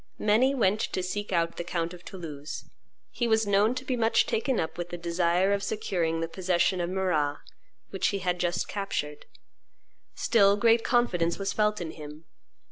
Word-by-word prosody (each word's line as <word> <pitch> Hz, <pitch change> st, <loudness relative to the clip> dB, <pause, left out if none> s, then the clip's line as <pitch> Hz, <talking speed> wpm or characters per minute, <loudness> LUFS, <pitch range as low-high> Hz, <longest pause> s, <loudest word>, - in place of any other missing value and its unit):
Many 240 Hz, +6 st, +3 dB
went 210 Hz, -4 st, +2 dB
to 185 Hz, -, -2 dB
seek 205 Hz, +3 st, -4 dB
out 170 Hz, -2 st, 0 dB
the -, -, -3 dB
count 170 Hz, 0 st, -2 dB
of 175 Hz, 0 st, -12 dB
Toulouse. 155 Hz, -6 st, -7 dB, 0.5 s
He 240 Hz, -, -1 dB
was 220 Hz, -1 st, +3 dB
known 205 Hz, +4 st, +3 dB
to 255 Hz, +1 st, -5 dB
be 260 Hz, -, -1 dB
much 225 Hz, -1 st, +3 dB
taken 245 Hz, +2 st, 0 dB
up 160 Hz, -, -2 dB
with 175 Hz, 0 st, -5 dB
the 175 Hz, -, -5 dB
desire 175 Hz, +3 st, +1 dB
of 200 Hz, -, 0 dB
securing 175 Hz, -6 st, -1 dB
the 165 Hz, -, -1 dB
possession 180 Hz, +1 st, +1 dB
of 175 Hz, -, -2 dB
Marrah, 170 Hz, -6 st, 0 dB, 0.5 s
which 195 Hz, -, 0 dB
he 200 Hz, -, 0 dB
had 180 Hz, -2 st, -1 dB
just 175 Hz, 0 st, -1 dB
captured; 150 Hz, -7 st, -4 dB, 0.9 s
still 200 Hz, -3 st, +4 dB
great 230 Hz, +1 st, +4 dB
confidence 175 Hz, -9 st, +1 dB
was 195 Hz, 0 st, -2 dB
felt 210 Hz, 0 st, +1 dB
in 165 Hz, -3 st, -4 dB
him. 150 Hz, +1 st, -10 dB
185 Hz, 180 wpm, -28 LUFS, 170-210 Hz, 0.9 s, still